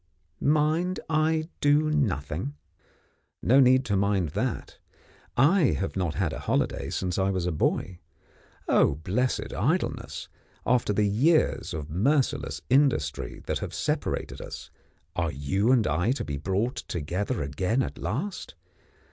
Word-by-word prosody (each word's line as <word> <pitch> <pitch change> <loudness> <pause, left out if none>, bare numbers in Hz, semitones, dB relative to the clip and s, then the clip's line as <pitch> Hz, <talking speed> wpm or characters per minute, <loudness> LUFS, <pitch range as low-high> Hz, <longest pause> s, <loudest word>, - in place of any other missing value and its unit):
Mind 155 +5 +2
I 155 +1 +2
do 150 +1 +3
nothing? 80 - -1 0.9
No 130 +4 +5
need 130 0 +5
to 100 - 0
mind 100 -4 +1
that. - - -3 0.6
I 150 +4 +4
have 95 - -3
not 90 -5 -1
had 90 -5 0
a - - -5
holiday - - -1
since 90 0 -2
I 95 0 +2
was 95 -3 -1
a 90 - 0
boy. 85 +3 -1 0.7
Oh, - - +4
blessed 100 - -1
Idleness, - - -1 0.4
after 125 -4 +2
the 105 +1 +2
years 150 +11 +2
of 75 -1 -5
merciless 135 - 0
industry 130 - +1
that - - -1
have - - -5
separated - - -2
us, - - -8 0.4
are 85 -2 0
you 95 - +1
and 120 -5 +4
I 90 - +1
to 140 - -4
be 70 -2 -3
brought 95 - -1
together 90 - -3
again 95 - 0
at - - -6
last? 170 - -4
105 Hz, 140 wpm, -27 LUFS, 90-140 Hz, 0.9 s, No